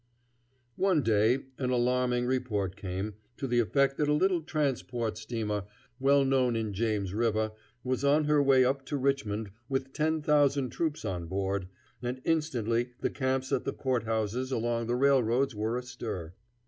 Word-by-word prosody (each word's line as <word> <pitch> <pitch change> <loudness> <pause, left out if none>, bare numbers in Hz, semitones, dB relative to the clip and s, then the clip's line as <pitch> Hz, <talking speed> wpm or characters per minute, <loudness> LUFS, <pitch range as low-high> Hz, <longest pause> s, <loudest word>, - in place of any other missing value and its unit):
One 185 -7 +3
day 110 +4 +3 0.2
an 130 -2 0
alarming 125 0 +1
report 110 -7 -1
came, 95 +3 -4 0.2
to - - -3
the 120 -2 +2
effect 135 +4 +2
that 150 - +1
a - - +4
little 180 +2 +2
transport 135 -8 -1
steamer, 110 -2 -3 0.3
well 140 +1 +4
known 130 -3 +2
in 110 -2 -2
James 105 -2 -1
River, 110 -1 +1 0.3
was 130 0 -1
on 145 +2 +4
her 150 -1 +3
way 135 -2 +5
up 135 +1 0
to 145 - -1
Richmond 110 -7 -1 0.2
with 135 0 -2
ten 155 0 0
thousand 145 -4 +3
troops 155 0 -2
on 90 -3 -3
board, 95 +1 -2 0.3
and 125 +1 -3
instantly 125 -7 0
the - - 0
camps 130 -1 -1
at - - +1
the 135 - -2
court 130 -4 -1
houses 110 +4 -1
along 115 -1 -1
the 120 - +1
railroads 135 -1 +3
were 110 +3 -1
astir. 110 -9 -6
125 Hz, 160 wpm, -29 LUFS, 110-140 Hz, 0.3 s, way